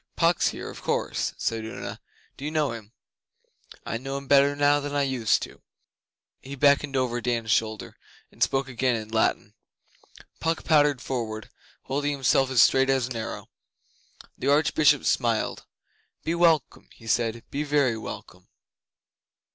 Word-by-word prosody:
'Puck's - - +2
here, - - -5
of - - -11
course,' - - -2
said 115 -1 -2
Una. 110 - -7 0.4
'Do - - -11
you 150 - -2
know 155 -3 0
him?' 110 -2 -9 0.9
'I 115 - -3
know 135 +2 -4
him 140 - -8
better 140 +1 +4
now 145 0 +3
than 145 0 -5
I 145 - +2
used 125 -6 +1
to.' - - -10 0.8
He 135 +1 -9
beckoned 140 0 +3
over 120 -2 -1
Dan's 115 -2 -1
shoulder, 110 -1 -1 0.4
and - - -22
spoke 135 0 +1
again 125 -1 0
in 110 -1 -6
Latin. 110 0 0 0.9
Puck 165 0 -1
pattered 145 -4 +3
forward, 110 -4 -4 0.3
holding 145 +2 -1
himself 135 -1 +2
as 130 -3 +6
straight 135 0 +3
as 135 -2 +2
an 125 0 -6
arrow. 115 0 -5 0.9
The 130 - -4
Archbishop 145 -1 +3
smiled. 115 -3 0 0.6
'Be 165 - -1
welcome,' 165 -5 +1 0.2
said 115 0 +1
he. 115 - -12
'Be 140 - -2
very 145 -5 +2
welcome. 110 - -9
135 Hz, 150 wpm, -26 LUFS, 115-145 Hz, 0.9 s, as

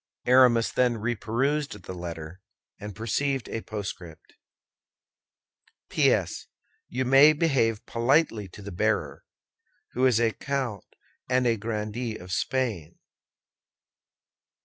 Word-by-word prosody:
Aramis 125 -2 +5
then 125 -2 +2
reperused 120 +4 -1
the 95 - -7
letter, 85 0 -7 0.4
and 105 -2 -8
perceived 135 +5 -1
a 115 - -4
postscript: 100 -7 -8 1.6
PS. - - +1 0.4
You 130 +1 -2
may 135 +4 +7
behave 135 -9 +1
politely 115 -3 +1
to 100 +3 -13
the 100 - -7
bearer, 85 - -1 0.7
who 130 +1 +2
is 120 -3 +3
a 115 -1 +2
count 130 -5 -3 0.4
and 125 0 +2
a 115 -1 +3
grandee 110 +1 -4
of 90 0 -11
Spain! 100 - -2
115 Hz, 105 wpm, -26 LUFS, 105-130 Hz, 1.6 s, may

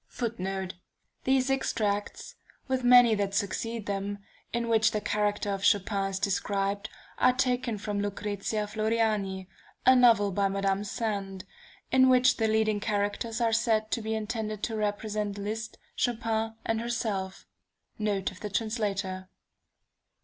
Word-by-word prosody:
[Footnote: 195 -5 -3 0.5
These 265 0 +2
extracts, 210 -6 -1 0.3
with 260 -1 0
many 245 -2 +7
that 200 -1 -1
succeed 215 +2 -2
them, 200 0 -3 0.3
in 235 0 -1
which 220 -1 +4
the 215 - -1
character 205 -1 0
of 195 0 -3
Chopin 200 -1 +2
is 195 - -3
described, 200 +1 -1 0.3
are 255 - +5
taken 250 -3 0
from 205 0 -3
Lucrezia 205 +1 -2
Floriani, 215 -3 0 0.4
a 260 - +7
novel 230 -5 +5
by 200 +1 +1
Madame 195 0 0
Sand, 200 -3 -3 0.5
in 260 0 +6
which 255 0 +5
the 225 - +2
leading 215 -1 +2
characters 210 +2 -1
are 230 -1 +2
said 220 -1 +1
to 235 - 0
be 220 0 -2
intended 215 -1 -3
to 225 - -1
represent 210 -1 -2
Liszt, 220 +2 -4 0.2
Chopin, 225 -2 -1
and 225 0 0
herself. 215 -5 -3 0.5
Note 205 -3 0
of 185 - -14
the 210 - -5
Translator. 200 -4 -2
215 Hz, 135 wpm, -28 LUFS, 200-230 Hz, 0.5 s, many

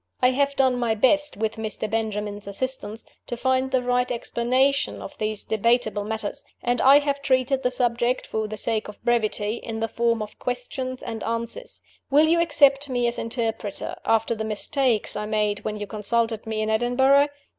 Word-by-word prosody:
I 250 0 +4
have 280 +1 +1
done 260 -2 +3
my 230 -2 +1
best, 295 +5 +3
with 220 +1 -2
Mr. 215 0 -2
Benjamin's 210 -2 -3
assistance, 220 0 -4 0.2
to 240 - -4
find 260 +1 +1
the 260 -1 +1
right 250 0 +1
explanation 255 +4 +1
of 290 - -9
these 215 -1 -1
debatable 220 -1 +1
matters; 220 -1 -3 0.2
and 245 0 +1
I 275 +2 +8
have 285 -1 0
treated 265 -1 +1
the 250 - +1
subject, 245 0 0
for 220 -1 -2
the 215 0 -6
sake 220 +1 -1
of 210 - -10
brevity, 220 -2 +1
in 225 -1 -6
the 225 - 0
form 230 -1 0
of 210 - -11
Questions 255 +1 -4
and 225 -1 -5
Answers. 235 - -4 0.3
Will 295 +3 +5
you 335 +1 +3
accept 290 -3 +4
me 245 -1 0
as 235 0 0
interpreter, 225 -3 -3
after 225 +1 +2
the 220 -1 -4
mistakes 220 +2 +1
I 210 0 -3
made 210 -1 0
when 215 - -4
you 210 -1 -5
consulted 225 +2 -1
me 220 -1 -2
in 215 - -1
Edinburgh? 265 +5 +4
235 Hz, 180 wpm, -24 LUFS, 220-260 Hz, 0.3 s, I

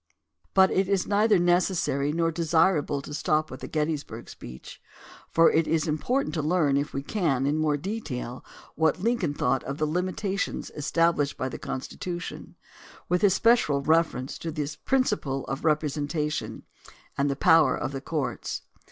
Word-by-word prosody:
But 190 -1 +6
it 190 0 +1
is 195 -2 +1
neither 210 0 +3
necessary 175 -5 +1
nor 165 +1 +1
desirable 160 -3 +1
to 150 - -8
stop 155 +1 0
with 130 - -7
the - - -7
Gettysburg 150 -7 -3
speech, 65 +1 -11 0.5
for 165 0 +5
it 160 0 +2
is 165 0 +1
important 245 - 0
to 155 - -1
learn, 155 -2 +2
if 145 +1 0
we 135 - -4
can, 140 -8 0
in 150 +2 +1
more 150 -2 +1
detail 145 - -5 0.3
what 160 0 +1
Lincoln 210 -11 0
thought 130 0 0
of 140 +1 -4
the 155 - 0
limitations 185 +4 -2
established 150 -1 +1
by 130 - -2
the - - -7
Constitution 175 +6 -6 0.5
with 180 0 +2
espe 210 +4 +5
cial 140 -1 -1
reference 160 -5 +1
to 165 - -4
the 150 -1 -4
principle 210 - 0
of 135 +1 -5
representation 150 0 -1 0.5
and 140 +1 +1
the 140 - -1
power 155 -1 +4
of - - -3
the 135 -1 -5
courts. 150 0 -3
155 Hz, 160 wpm, -26 LUFS, 140-180 Hz, 0.5 s, But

